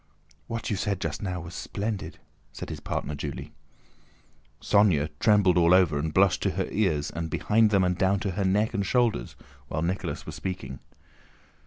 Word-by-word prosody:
"What 115 -1 -4
you 105 - 0
said 100 0 -1
just 80 -4 -3
now 90 -3 -3
was 85 0 -9
splendid!" 105 0 -4 0.3
said - - -7
his - - -5
partner 75 - -3
Julie. 70 -2 -6 1.1
Sónya 90 -8 +3
trembled 100 -5 +4
all 85 +1 +6
over 85 -6 +3
and 80 +1 -2
blushed 95 +3 +3
to - - +1
her - - 0
ears 85 -9 0
and 80 0 -4
behind 110 +6 +3
them 100 -2 +3
and 90 0 +1
down 95 +2 +2
to 100 - -1
her 100 +3 -2
neck 105 +4 +1
and 100 - 0
shoulders 115 - 0 0.3
while 80 - -2
Nicholas 90 +3 -3
was - - -7
speaking. 90 -8 -5
95 Hz, 175 wpm, -27 LUFS, 80-105 Hz, 1.1 s, all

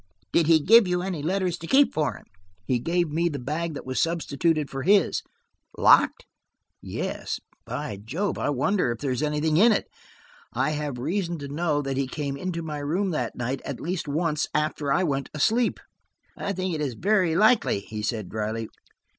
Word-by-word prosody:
"Did 165 -2 +3
he 165 -1 +6
give 220 +6 +6
you 180 0 0
any 180 -5 -3
letters 180 +2 -1
to 165 - -7
keep 275 +6 +4
for 155 -2 0
him?" - - -13 0.4
"He 125 +3 +1
gave 170 +4 0
me 170 +3 +1
the 145 - -4
bag 155 +5 -3
that - - -7
was 130 0 -2
substituted 165 -2 0
for 135 0 -5
his." 195 +3 +3 0.6
"Locked?" - - +5 0.6
"Yes. - - -4 0.3
By 100 - -4
Jove, 175 - -2
I - - 0
wonder 145 +2 +1
if 115 - -3
there 135 +2 -2
is 125 - -1
anything 150 +1 +1
in 225 +6 +6
it? 215 - +1 0.7
I 130 +5 +1
have 150 -4 -3
reason 170 +6 -2
to 145 -2 -6
know 150 0 0
that 135 -1 -3
he 135 -1 0
came 140 0 -3
into 170 +2 -4
my 155 -2 -4
room 175 +7 -1
that 125 -7 -2
night 125 +2 -3
at 140 - -5
least 175 -1 -3
once 155 +1 0
after 150 -2 0
I 180 - +3
went 140 -5 -1
asleep." 225 +10 +2 0.6
"I 200 - -3
think 185 -1 -2
it 155 - -2
is 135 -5 -2
very 185 - +2
likely," 215 - +4
he 105 +1 -6
said 105 -2 -2
dryly. 110 +2 -3
155 Hz, 190 wpm, -25 LUFS, 140-180 Hz, 0.7 s, he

